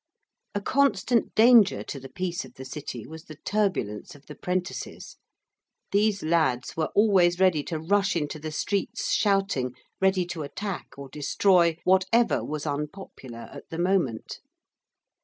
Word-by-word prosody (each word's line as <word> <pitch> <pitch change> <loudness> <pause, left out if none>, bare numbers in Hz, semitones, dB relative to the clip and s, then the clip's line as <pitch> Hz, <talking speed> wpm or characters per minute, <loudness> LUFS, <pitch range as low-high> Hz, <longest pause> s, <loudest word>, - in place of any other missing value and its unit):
A 205 - -1
constant 260 -1 +1
danger 225 -3 +6
to 140 - -6
the 135 0 -10
peace 180 +3 -3
of 130 -2 -14
the 130 - -9
City 130 -4 -7
was 160 +3 -11
the 155 - -10
turbulence 190 - -1
of 145 - -18
the 150 - -9
prentices, 180 +2 -4 0.7
these 205 0 +2
lads 155 -7 +1
were 160 -1 -1
always 185 -4 +4
ready 185 -5 +4
to 165 - -3
rush 195 +5 +1
into 155 -1 -2
the 155 +1 -5
streets, 195 +5 -2
shouting, 195 - +1 0.3
ready 190 -1 +3
to 170 -2 -5
attack 180 +6 -5
or 140 0 -8
destroy 170 +4 +2
whatever 190 +6 +3
was 150 0 -4
unpopular 145 -5 -6
at - - -11
the 165 - -6
moment. 175 -10 0
175 Hz, 145 wpm, -26 LUFS, 150-195 Hz, 0.7 s, danger